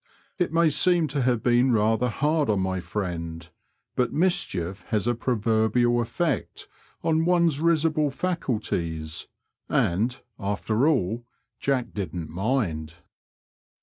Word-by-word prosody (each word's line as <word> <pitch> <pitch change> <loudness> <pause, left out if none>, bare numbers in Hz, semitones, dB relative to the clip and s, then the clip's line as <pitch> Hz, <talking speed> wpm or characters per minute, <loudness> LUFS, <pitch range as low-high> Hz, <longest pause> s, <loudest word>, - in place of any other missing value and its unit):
It 175 -3 +1
may 165 -1 +4
seem 175 +2 +3
to 140 0 -1
have 125 -2 +1
been 120 +1 +4
rather 110 +3 +2
hard 150 +4 +1
on 105 -2 +2
my 95 0 -1
friend, 85 -3 -4 0.5
but 125 - +1
mischief 95 - 0
has 105 -3 0
a 120 - +2
proverbial 120 0 +2
effect 155 +5 -2 0.4
on 160 0 +2
one's 170 -4 +3
risible 155 -2 +2
faculties, 105 - -2 0.4
and, 110 +9 +1 0.2
after 105 +6 0
all. 120 - 0 0.3
Jack 135 -3 -1
didn't 90 -5 -4
mind. 90 - -1
120 Hz, 115 wpm, -25 LUFS, 95-150 Hz, 0.5 s, may